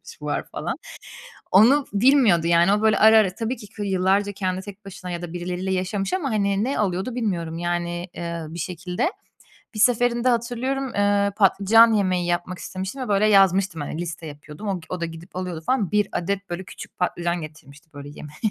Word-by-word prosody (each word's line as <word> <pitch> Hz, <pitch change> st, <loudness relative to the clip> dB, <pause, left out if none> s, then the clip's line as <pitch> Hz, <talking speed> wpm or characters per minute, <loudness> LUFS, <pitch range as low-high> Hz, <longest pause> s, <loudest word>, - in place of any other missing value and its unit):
şu -, -, -12 dB
var -, -, -2 dB
falan. -, -, -3 dB, 0.8 s
Onu 250 Hz, +9 st, +6 dB
bilmiyordu 205 Hz, -, +4 dB
yani. 170 Hz, +3 st, +4 dB
O 210 Hz, -, +1 dB
böyle 220 Hz, -1 st, +3 dB
ara 220 Hz, +1 st, +7 dB
ara 195 Hz, -4 st, +3 dB
tabii 235 Hz, +3 st, -3 dB
ki 210 Hz, -, -11 dB, 0.2 s
yıllarca 195 Hz, +1 st, +1 dB
kendi 185 Hz, -2 st, -3 dB
tek 205 Hz, 0 st, -11 dB
başına 185 Hz, -2 st, -8 dB
ya 175 Hz, -, -4 dB
da 175 Hz, -1 st, -7 dB
birileriyle 180 Hz, +2 st, -3 dB
yaşamış. 190 Hz, +1 st, -2 dB
Ama, 340 Hz, -8 st, -1 dB
hani, 200 Hz, -1 st, +1 dB
ne 265 Hz, +4 st, -1 dB
alıyordu 195 Hz, +4 st, -1 dB
bilmiyorum, 175 Hz, -9 st, -2 dB
yani, 175 Hz, 0 st, -2 dB
ııı, 170 Hz, -2 st, -5 dB
bir 170 Hz, -, -6 dB
şekilde. 180 Hz, -, -2 dB, 0.6 s
Bir 215 Hz, -, -6 dB
seferinde 245 Hz, +1 st, +3 dB
hatırlıyorum, 250 Hz, +3 st, -1 dB
eee, 205 Hz, 0 st, +2 dB
patlıcan 220 Hz, +3 st, +5 dB
yemeği 185 Hz, -4 st, +1 dB
yapmak 175 Hz, +1 st, -2 dB
istemiştim 190 Hz, +8 st, -6 dB
ve -, -, -6 dB
böyle 205 Hz, 0 st, +2 dB
yazmıştım, 195 Hz, -4 st, +3 dB
hani, 155 Hz, +3 st, -4 dB
liste 165 Hz, -1 st, -6 dB
yapıyordum. 150 Hz, +6 st, -10 dB
O 195 Hz, -2 st, -1 dB
o 180 Hz, -1 st, -4 dB
da -, -, 0 dB
gidip 165 Hz, +2 st, -11 dB
alıyordu 180 Hz, -3 st, -4 dB
falan. 230 Hz, -8 st, 0 dB
1 210 Hz, -1 st, +2 dB
adet 195 Hz, +2 st, -3 dB
böyle 175 Hz, +2 st, -4 dB
küçük -, -, -11 dB
patlıcan 175 Hz, -1 st, -1 dB
getirmişti 155 Hz, 0 st, -12 dB
böyle 145 Hz, 0 st, -9 dB
yemek 150 Hz, 0 st, -11 dB
190 Hz, 185 wpm, -23 LUFS, 175-215 Hz, 0.8 s, ara